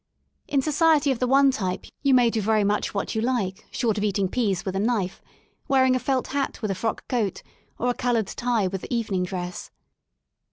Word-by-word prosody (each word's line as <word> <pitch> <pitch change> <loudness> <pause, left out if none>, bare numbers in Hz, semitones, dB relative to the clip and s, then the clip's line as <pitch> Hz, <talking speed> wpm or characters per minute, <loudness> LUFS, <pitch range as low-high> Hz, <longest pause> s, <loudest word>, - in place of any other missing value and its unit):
In 275 -2 +1
society 305 -1 +3
of 255 - -2
the 250 - +1
one 275 +1 +5
type 185 -8 -3 0.2
you 275 -2 +4
may 240 -2 +4
do 225 - -1
very 215 0 +2
much 205 +1 0
what 200 - -2
you 220 - -1
like 225 -6 -2
short 220 -4 0
of - - -2
eating 200 -2 +1
peas 200 -5 0
with 190 -1 -3
a - - 0
knife, 205 -4 -1 0.5
wearing 260 -1 +4
a - - +1
felt 255 +1 -1
hat 280 0 -2
with 215 -3 -2
a - - +1
frock 220 +4 -3
coat, 220 -7 -1 0.3
or 245 - -1
a 245 - +2
coloured 240 -3 0
tie 235 0 -1
with 190 0 -4
evening 220 -6 -1
dress. 180 -1 -5
230 Hz, 205 wpm, -25 LUFS, 195-255 Hz, 0.5 s, one